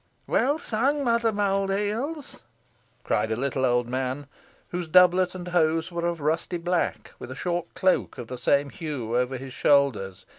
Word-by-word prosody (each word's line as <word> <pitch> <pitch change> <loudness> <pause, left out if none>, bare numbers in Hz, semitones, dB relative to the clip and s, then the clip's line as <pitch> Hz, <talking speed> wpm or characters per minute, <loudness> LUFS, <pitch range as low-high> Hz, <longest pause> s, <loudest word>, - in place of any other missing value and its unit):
"Well 285 +3 +2
sung, 280 +1 0
Mother 235 -2 +2
Mould 195 -1 0
heels," 230 +10 -3 0.6
cried - - 0
a - - +1
little 130 +2 -1
old 120 -1 +2
man, 130 +3 -3 0.4
whose 175 -1 -4
doublet 180 +2 +5
and 180 -1 -6
hose 165 -1 +1
were 170 0 -1
of 170 -2 -3
rusty 160 +4 0
black, 175 +1 -2
with - - -8
a 130 - -6
short 175 +3 -3
cloak, 185 -1 +1
of 120 - -6
the 125 +2 -7
same 140 +3 +2
hue, 130 -8 -4
over 125 +1 0
his 130 0 -8
shoulders. 130 -12 +2
170 Hz, 170 wpm, -26 LUFS, 130-195 Hz, 0.6 s, doublet